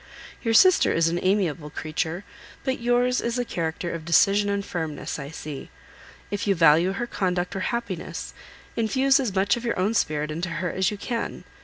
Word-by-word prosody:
Your 225 -2 +1
sister 370 +8 +6
is 165 0 +3
an 170 +1 -1
amiable 180 -6 0
creature; 160 +4 -3 0.4
but 265 -1 -1
yours 245 +1 +2
is 235 0 -2
the 245 -1 -1
character 170 -2 -3
of 165 -1 -5
decision 200 +5 +4
and 200 0 -1
firmness, 160 -5 -4
I 140 0 -6
see. 150 -3 -7 0.6
If 205 0 -2
you 200 - +3
value 165 +2 +5
her 240 - -2
conduct 180 -5 -1
or - - -2
happiness, 220 -8 -4 0.4
infuse 265 +4 +3
as 235 -8 -2
much 195 +1 +3
of 235 - -7
your 235 - -1
own 200 +4 +1
spirit 150 -7 0
into 170 +3 -3
her 180 0 -2
as 190 0 +1
you 210 - -5
can. 230 +3 -4
190 Hz, 185 wpm, -25 LUFS, 165-230 Hz, 0.6 s, sister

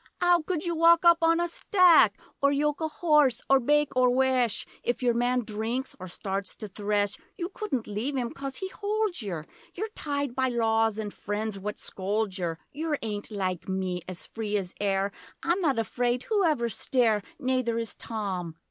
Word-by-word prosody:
''Ow 350 -2 +4
could 360 -2 -1
you 345 - 0
wok 335 +1 +5
up 340 -1 +7
on 330 0 +4
a 345 - +1
stack? 360 0 +5 0.2
Or 280 0 +4
yok 295 +2 0
a 315 - +1
hoss 300 -6 +3
or 270 0 +5
bake 295 +2 +2
or 255 0 +5
wesh; 255 -3 +2 0.2
If 245 +1 -2
your 240 -1 +3
man 245 +1 +1
drinks 225 +4 -3
or 185 - -7
starts 195 +2 -4
to 215 - -7
thresh 205 0 -1 0.2
You 345 -1 -3
couldn't 305 - -3
leave 230 +7 -3
him 240 -2 -1
coz 275 -1 -6
he 380 +5 -4
holds 415 - -1
yer: 175 -7 -4 0.3
You're 435 +5 -3
tied 285 - -3
by 260 0 +1
laws 225 -2 +2
and 210 -2 -4
friends 205 0 -3
what 210 +2 -4
scolds 200 0 -2
yer; 170 -2 -2
Yer 305 +1 -2
ain't 205 -2 -4
like 190 -4 -3
me, 185 -1 -2
as 185 -1 -4
free 210 -2 -2
as 185 -2 -4
air. 195 0 +1 0.3
I'm 350 +3 +1
not 285 -8 +2
afraid 245 +3 0
whoever 330 - +2
stare, 225 -1 +2 0.2
Nayther 255 -3 0
is 230 -1 -2
Tom! 190 -7 -4
245 Hz, 185 wpm, -27 LUFS, 205-300 Hz, 0.3 s, up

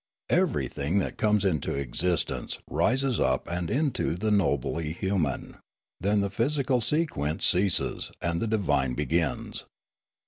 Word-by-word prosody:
Everything 75 +6 +1
that 100 - 0
comes 105 -2 +2
into 80 -8 0
existence 70 +6 -1
rises 130 0 +1
up - - +1
and 85 -1 -2
into 140 - 0
the 105 +4 -1
nobly 80 -4 +1
human; 90 -7 -2 0.4
then 100 +3 +2
the 100 -1 -1
physical 130 +3 +1
sequence 110 - 0
ceases 95 0 +1
and 85 0 -1
the 115 - 0
divine 75 - +1
begins. 75 +1 -1
95 Hz, 125 wpm, -27 LUFS, 80-110 Hz, 0.4 s, comes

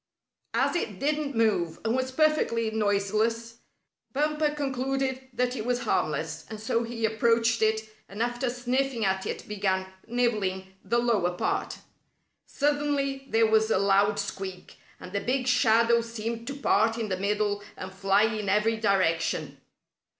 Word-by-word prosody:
As - - +2
it 215 - -2
didn't 295 -1 -1
move, 205 -8 +1
and 225 +2 +1
was 260 0 -1
perfectly 260 -6 +2
noiseless, 220 +2 0 0.5
Bumper 300 +2 +1
concluded 270 -2 -2
that 250 +1 -1
it 220 - -3
was 245 +1 0
harmless, 155 +1 -1
and 215 -1 -7
so 230 +1 0
he 230 -1 -2
approached 230 +1 +2
it 220 0 +1 0.2
and 200 - -9
after 240 +1 -1
sniffing 250 -1 -1
at 190 0 0
it - - -5
began 195 -2 0 0.2
nibbling 205 -6 -1
the 235 - 0
lower 210 -7 +1
part. - - -1 0.7
Suddenly 285 -2 0
there 225 0 +4
was 220 0 +3
a - - +3
loud 200 +1 +3
squeak, 190 -2 -6 0.2
and 180 - -10
the 200 - -1
big 255 +1 0
shadow 235 -1 +4
seemed 230 0 -5
to 280 - -4
part 225 -5 +2
in 225 -2 -3
the 185 - -1
middle 205 +1 0 0.2
and 190 0 -7
fly 195 +1 +3
in 215 -3 -1
every 210 +3 +2
direction. 165 -8 0
225 Hz, 150 wpm, -27 LUFS, 200-250 Hz, 0.7 s, there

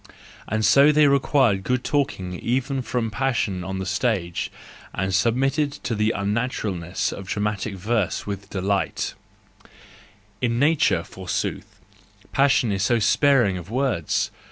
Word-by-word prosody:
And 110 +1 0
so 140 +8 +6
they 150 0 +5
required 135 -7 +3
good 125 +3 0
talking 95 -11 -1
even 130 +2 -1
from 120 -3 -2
passion 115 -8 -1
on 95 +1 -4
the 95 - -3
stage, 95 -3 -1 0.4
and 95 0 -1
submitted 135 +8 +1
to 120 - -4
the 105 0 +1
unnaturalness 100 -4 -2
of 95 - -8
dramatic 105 0 -2
verse 105 0 -1
with 100 -1 -6
delight: 100 +1 -1 1.3
—in 120 -2 +1
nature, 140 - +3
forsooth, 95 +1 -5 0.5
passion 135 -4 +3
is 95 -1 -1
so 120 +4 +3
sparing 115 -2 +3
of 85 +2 -11
words 120 - 0
110 Hz, 130 wpm, -23 LUFS, 95-130 Hz, 1.3 s, so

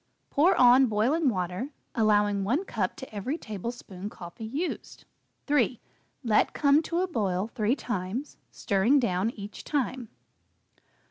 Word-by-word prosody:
Pour 330 +7 +4
on 255 +1 +7
boiling 255 +8 +2
water, 185 +5 -3 0.2
allowing 205 -3 +2
1 270 - 0
cup 200 - -2
to 265 -4 -10
every 255 +10 -2
tablespoon 210 - -6
coffee 180 +4 -9
used. 300 +10 -5 0.4
3. 260 -5 +2 0.4
Let 220 -3 +2
come 285 +1 +4
to 335 +2 -1
a 375 - 0
boil 205 - -1
three 225 +1 +1
times, 230 +3 -4
stirring 205 +7 +2
down 195 -3 +1
each 205 -3 -9
time. 260 -5 -2
230 Hz, 130 wpm, -27 LUFS, 205-275 Hz, 0.4 s, on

